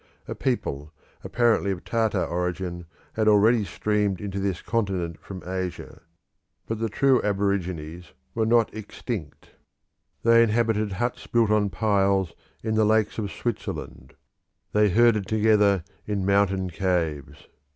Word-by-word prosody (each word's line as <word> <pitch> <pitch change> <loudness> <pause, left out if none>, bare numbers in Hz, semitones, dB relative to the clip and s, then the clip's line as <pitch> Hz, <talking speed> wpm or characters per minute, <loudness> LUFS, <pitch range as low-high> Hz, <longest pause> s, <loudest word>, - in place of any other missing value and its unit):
A - - -4
people, 75 +3 -2 0.3
apparently 120 -4 +2
of 95 -3 -3
Tartar 115 -2 0
origin, 90 0 -3 0.3
had 110 -1 0
already 110 +2 +5
streamed 100 0 -1
into 100 0 -4
this 95 -3 -1
continent 95 -8 -2
from 95 +2 -9
Asia; 95 -1 -5 0.6
but 115 -1 -4
the 115 0 -1
true 130 +4 +3
aborigines 90 -5 -2 0.2
were 110 - 0
not 115 -1 +3
extinct; 105 - -7 0.7
they 115 0 +6
inhabited 110 -2 +1
huts 120 +5 -3
built 115 -3 +2
on 105 -1 +2
piles 95 -2 +1 0.3
in 110 -1 -1
the 110 0 +3
lakes 110 +1 +2
of 100 -2 -3
Switzerland; 105 - -5 0.6
they 105 0 +4
herded 110 -1 +3
together 105 -4 +3 0.2
in 100 -2 -1
mountain 95 -2 +1
caves. 85 -6 -2
100 Hz, 130 wpm, -25 LUFS, 95-110 Hz, 0.7 s, they